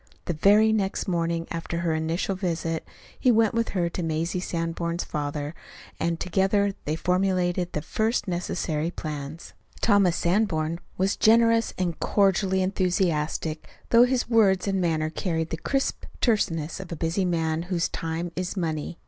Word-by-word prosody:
The 175 - -1
very 210 +7 +5
next 195 -3 -1
morning 170 -2 0
after 170 0 -3
her 170 -2 0
initial 160 +4 -1
visit, 165 -3 -2 0.4
he 255 - +3
went 225 -2 +4
with 230 0 0
her 175 -1 +2
to 175 - -4
Mazie 165 +2 -1
Sanborn's 170 0 -2
father, 145 0 -3 0.5
and 165 0 -1
together 195 +2 +1
they 150 - 0
formulated 180 0 0
the 150 - -2
first 220 +6 0
necessary 170 -3 -2
plans. 150 -1 -6 0.3
Thomas 200 -5 +4
Sanborn 170 -4 0 0.2
was 190 +2 +1
generous, 230 0 +4
and 175 -3 -2
cordially 190 -1 +2
enthusiastic, 175 -4 -1 0.2
though 235 +1 +7
his 250 -1 0
words 205 -5 +3
and 195 -1 +1
manner 155 -2 0
carried 160 -2 -2
the 165 - -2
crisp 270 +10 -1
terseness 170 - 0
of 190 - -7
the 170 - -5
busy 165 +4 -1
man 165 -2 0
whose 175 -3 +1
time 165 +1 -4
is 185 +2 -3
money. 160 -1 -2
175 Hz, 150 wpm, -26 LUFS, 165-195 Hz, 0.5 s, though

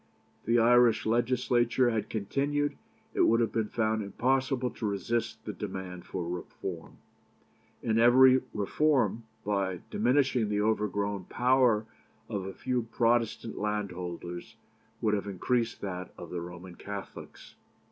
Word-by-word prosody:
If - - -30
the 115 +1 +4
Irish 120 0 +5
Legislature 120 +1 +2
had 110 -1 -2
continued, 140 +7 -1 0.4
it - - +1
would 115 - +5
have 115 - +1
been 110 -2 0
found 110 -1 0
impossible 130 +4 0
to 110 - -4
resist 110 +4 -2
the - - -4
demand 90 -2 -6
for 90 -3 -4
reform; 90 0 -6 0.9
and 110 0 +2
every 130 +2 +7
reform, 120 +2 +1 0.2
by 95 -3 -1
diminishing 125 -1 +2
the 105 -1 0
overgrown 105 -2 0
power 125 -3 +3 0.4
of 100 -4 -3
a 95 - -6
few 125 -1 -1
Protestant 115 -1 +1
landholders, 90 -4 -4 0.5
would 105 - +2
have 100 -1 -1
increased 115 +5 -1
that 90 -2 -5
of - - -9
the 90 - -3
Roman 90 +1 -9
Catholics. 100 +2 -9
110 Hz, 130 wpm, -29 LUFS, 100-120 Hz, 0.9 s, every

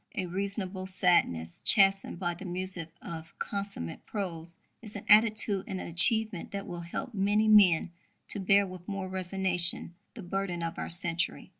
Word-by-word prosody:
A 185 - -3
reasonable 190 0 -4
sadness, 175 - 0
chastened 195 -4 +4
by 175 -1 -3
the 170 - -12
music 180 -2 -6
of 165 -1 -10
consummate 200 - -6
prose, 170 -5 -6 0.2
is 215 -2 -6
an 205 - -8
attitude 215 -2 +3
and 190 - -5
an - - -7
achievement 205 +2 +4
that 200 0 -7
will 175 -1 -8
help 175 +8 -7
many 205 +2 0
men 185 -6 +4 0.4
to - - 0
bear 200 +1 +3
with 185 -2 -12
more 195 -2 -5
resignation 185 -2 +3 0.2
the 220 - -9
burden 180 -1 -4
of 165 0 -5
our - - -5
century. 175 0 -3
185 Hz, 160 wpm, -28 LUFS, 175-200 Hz, 0.4 s, chastened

